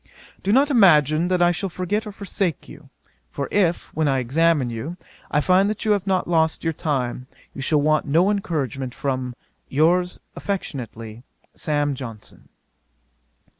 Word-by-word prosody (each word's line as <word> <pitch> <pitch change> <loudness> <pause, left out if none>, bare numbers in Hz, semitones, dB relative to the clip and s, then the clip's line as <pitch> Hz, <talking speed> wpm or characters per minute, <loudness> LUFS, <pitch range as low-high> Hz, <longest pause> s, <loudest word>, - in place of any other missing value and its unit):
'Do 195 - 0
not 275 +5 +4
imagine 165 - +5
that 180 -1 +2
I 175 - +5
shall 190 +3 -3
forget 205 +5 -2
or - - -5
forsake 195 -4 -3
you; - - -13 0.4
for 140 - -4
if, 180 -4 +1
when 160 -1 0
I 135 -1 +2
examine 140 +1 +2
you, 140 +10 -5 0.3
I 150 - +2
find 185 +4 +3
that 215 0 -4
you 215 - +3
have 200 -2 +1
not 190 -2 +1
lost 160 -2 +1
your 165 -1 0
time, 130 -5 -2 0.3
you 140 - -7
shall 145 +1 +2
want 155 0 +2
no 170 +8 +3
encouragement 135 - -3
from 130 -3 -3 0.3
'Yours 175 +5 +2 0.2
affectionately, 120 - -5 0.3
'SAM. 145 -2 0
JOHNSON.' 115 -5 -10
160 Hz, 155 wpm, -22 LUFS, 135-185 Hz, 0.4 s, imagine